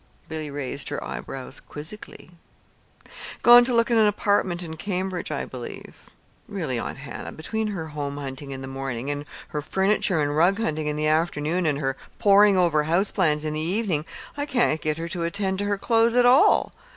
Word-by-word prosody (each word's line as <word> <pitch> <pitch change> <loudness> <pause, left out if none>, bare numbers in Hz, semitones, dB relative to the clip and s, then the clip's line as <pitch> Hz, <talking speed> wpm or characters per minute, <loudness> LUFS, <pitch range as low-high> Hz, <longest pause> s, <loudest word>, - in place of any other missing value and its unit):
Billy 155 -1 -5
raised 140 -1 -4
her - - -4
eyebrows 135 0 -6
quizzically. 160 +3 -8 1.1
"Gone 240 0 +9
to 255 - +1
look 230 +1 +2
at 230 - +4
an 215 -1 +5
apartment 200 -4 +1
in 160 -2 -6
Cambridge, 185 0 -3
I 150 - -3
believe. 125 -2 -10 0.4
Really, - - -3
Aunt - - -5
Hannah, - - -7
between 220 +7 -3
her 175 -7 -4
home 145 -1 -4
hunting 140 0 -6
in 135 -1 -6
the - - -6
morning, 135 0 -4
and 145 0 -4 0.2
her 150 - -3
furniture 190 +1 +1
and 145 -1 0
rug 175 +5 +4
hunting 155 -8 -1
in 150 - -1
the 150 0 -1
afternoon, 160 +2 +1
and 145 -2 +1
her 135 -2 -1 0.2
poring 200 -1 +5
over 160 -4 +3
house 175 +6 +2
plans 155 -5 +1
in 155 - -2
the 155 - -2
evening, 175 -1 0 0.3
I 290 0 -3
can't 240 - +1
get 155 0 -1
her 165 +1 -4
to 170 0 -3
attend 190 +2 -1
to 205 - -1
her 205 0 0
clothes 230 +2 +2
at 245 0 +5
all. 250 +3 +5
165 Hz, 190 wpm, -24 LUFS, 150-205 Hz, 1.1 s, Gone